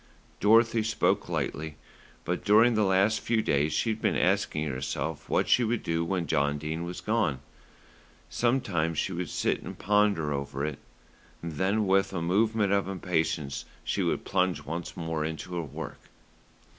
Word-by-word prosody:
Dorothy 115 +2 +5
spoke 110 +1 +1
lightly; 80 0 -3 0.5
but 90 +1 -2
during 110 +4 +5
the 110 -1 +2
last 95 +3 +3
few 110 -1 0
days 75 +2 +1
she 110 +9 +1
had 110 0 -4
been - - +1
asking 75 0 +1
herself 65 -2 -4
what - - +2
she 125 - +4
would 115 0 -1
do 85 0 0
when 85 0 -1
John 70 -1 +1
Dene 80 +3 -4
was 90 +1 -6
gone. 105 - 0 0.9
Sometimes 100 - 0
she 95 - -1
would 90 -2 -3
sit - - 0
and - - -8
ponder 100 -7 +2
over 70 0 -3
it, 75 -2 -4 0.6
then 95 +7 0
with 95 0 +2
a 90 - -1
movement 105 +3 +2
of 100 -1 +1
impatience 80 -6 -2 0.2
she - - -1
would - - -1
plunge 90 -1 0
once 85 +3 -5
more 80 -2 -2
into 80 +3 -5
her 85 - -1
work. 75 +1 -7
90 Hz, 160 wpm, -28 LUFS, 80-105 Hz, 0.9 s, Dorothy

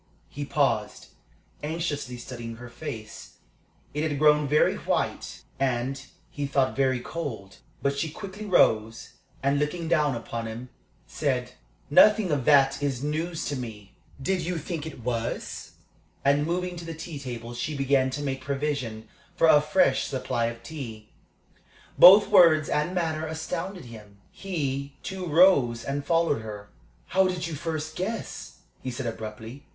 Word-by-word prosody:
He 145 0 -5
paused, 125 -8 0 0.5
anxiously 150 -5 -3
studying 120 -1 -7
her 120 +1 -10
face. 120 -4 -8 0.6
It 150 - -2
had 145 - -2
grown 150 0 +4
very 150 +2 +3
white, - - -2 0.2
and, 135 +1 -1 0.3
he 145 -1 -3
thought, 135 -1 +1
very 130 -2 +2
cold. 115 -9 -6 0.3
But 140 0 0
she 160 - -1
quickly 200 +5 -8
rose, 115 - +2 0.3
and, 140 +1 +2
looking 160 +3 -2
down 150 -5 +2
upon 115 0 -5
him, 115 +3 -7 0.4
said: - - -2 0.4
"Nothing 210 +3 +6
of 140 -4 0
that 140 -2 +5
is 135 -2 -1
news 160 +3 -2
to 145 - -2
me. 110 -6 -8 0.3
Did 185 +7 0
you 175 +1 -2
think 160 0 -4
it 155 - -9
was?" 115 -1 -3 0.5
And 145 +2 +3
moving 180 +1 -2
to 170 - -7
the 165 -1 -6
tea 160 -1 -7
table, 120 -3 -6
she 130 +5 -3
began 135 -1 +2
to 145 +3 -4
make 135 -2 -3
provision 135 -5 -3 0.3
for 175 - +3
a 150 -2 +7
fresh 150 -2 +2
supply 125 -3 -1
of 115 0 -7
tea. 115 -6 -8 0.9
Both 195 +3 +10
words 155 -3 +6
and 150 +5 0
manner 160 -3 -1
astounded 165 +3 -5
him. 105 -4 -12
He, 140 -7 -3
too, 190 -2 -5
rose 145 -9 +4
and 140 +1 -3
followed 165 -4 +1
her. 105 -2 -8 0.4
"How 190 0 +4
did 180 -1 -2
you 165 - -5
first 155 0 -4
guess?" 215 +5 -5 0.2
he 130 - -4
said, 125 +1 -5
abruptly. 110 +4 -7
140 Hz, 150 wpm, -26 LUFS, 120-160 Hz, 0.9 s, Both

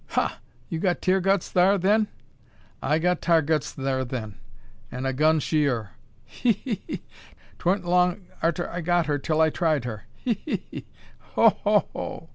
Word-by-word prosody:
"Ha! - - +1 0.3
you 165 -4 -3
got 180 0 +1
Tear 185 +1 +2
guts 195 0 +1
thar 185 +3 +4
then?" 210 +4 +3 0.7
"I 150 +3 +2
got 180 +2 +1
Tar 165 -2 +4
guts 150 -1 0
thur 135 -1 -1
then, 120 -4 -5 0.6
an' 125 +1 -4
a 135 - 0
gun 155 +4 +3
she 150 -1 +1
ur. 110 -5 -3 0.3
He! 245 -3 +1
he! 220 -1 -5
he! - - -5 0.6
'Twa'n't 180 +1 +1
long 180 +1 +2 0.2
arter 170 +2 0
I 175 - -4
got 175 0 +2
her 145 -1 0
till 155 +3 -1
I 160 -1 +4
tried 155 -7 +1
her. 110 -3 -6
He! 230 -5 -2
he! 315 - -3
he! - - -7 0.5
Ho! - - +7
ho! - - +3
hoo!" - - -6
165 Hz, 180 wpm, -25 LUFS, 145-180 Hz, 0.7 s, Ho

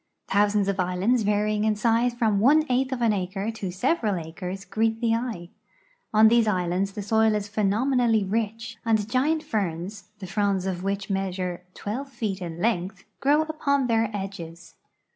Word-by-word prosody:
Thousands 205 0 +2
of 200 -1 -1
islands, 185 +7 +1
varying 210 0 +1
in 215 -1 +2
size 230 +3 +2
from 220 -4 +2
one 295 +8 +5
eighth 260 +1 +1
of 250 -2 -2
an 225 -2 +4
acre 195 +2 -2
to 210 -4 -5
several 210 - 0
acres, 180 +3 -6
greet 225 0 0
the 230 -1 +1
eye. 230 -8 -3 0.6
On 215 +1 +6
these 230 0 +4
islands 185 0 0
the 205 - -5
soil 220 +1 +3
is 210 -1 -2
phenomenally 220 +2 +2
rich, 225 +3 -3
and 220 -3 +1
giant 295 +7 +1
ferns, 195 0 -3
the 200 - -8
fronds 195 -1 0
of 185 -1 -3
which 195 0 -2
measure 185 -2 -2
12 255 +7 -4
feet 215 -7 -4
in 170 -1 -6
length, 190 -3 -1 0.2
grow 295 +3 +3
upon 285 -3 0
their 225 -2 +2
edges. 175 -5 -7
210 Hz, 165 wpm, -25 LUFS, 195-230 Hz, 0.6 s, On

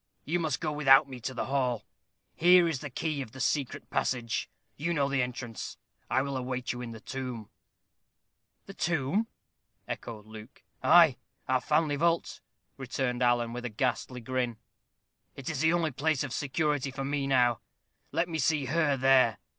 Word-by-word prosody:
You 170 +4 0
must 160 -3 -1
go - - -1
without 145 -1 +6
me 130 -2 -8
to 130 +3 -4
the 115 - -2
hall. 125 -4 0 0.5
Here 175 +1 +6
is 160 -5 -1
the 145 - -6
key 150 +2 -2
of 110 -5 -8
the 130 - -10
secret 135 0 -1
passage. 115 -3 -1 0.3
You 170 +4 -1
know 140 -2 +2
the 140 -1 +1
entrance. 125 -2 -5 0.3
I 130 - +2
will 140 -1 -3
await 125 -1 -2
you 120 - -6
in 120 -1 -6
the 115 - -9
tomb." 125 -4 -6 1.1
"The 195 - -9
tomb!" 175 +5 0 0.6
echoed 110 -3 -6
Luke. 110 +3 -12 0.2
"Ay, 165 -6 +6 0.3
our 130 -1 +2
family 150 -1 +1
vault," 170 +2 0 0.4
returned 125 -1 -2
Alan, 120 -1 +2
with 125 0 -5
a 120 - -3
ghastly 125 +2 -2
grin 125 -1 -2 0.8
"it 140 +3 -4
is 150 - -4
the 160 0 +4
only 170 -2 +1
place 150 +1 0
of 130 -4 -5
security 145 0 0
for 135 0 -5
me 140 0 -1
now. 125 -4 +3 0.5
Let 170 - +1
me 160 -2 -3
see 150 0 +2
her 145 0 +1
there. 130 -4 +4
135 Hz, 170 wpm, -29 LUFS, 125-150 Hz, 1.1 s, without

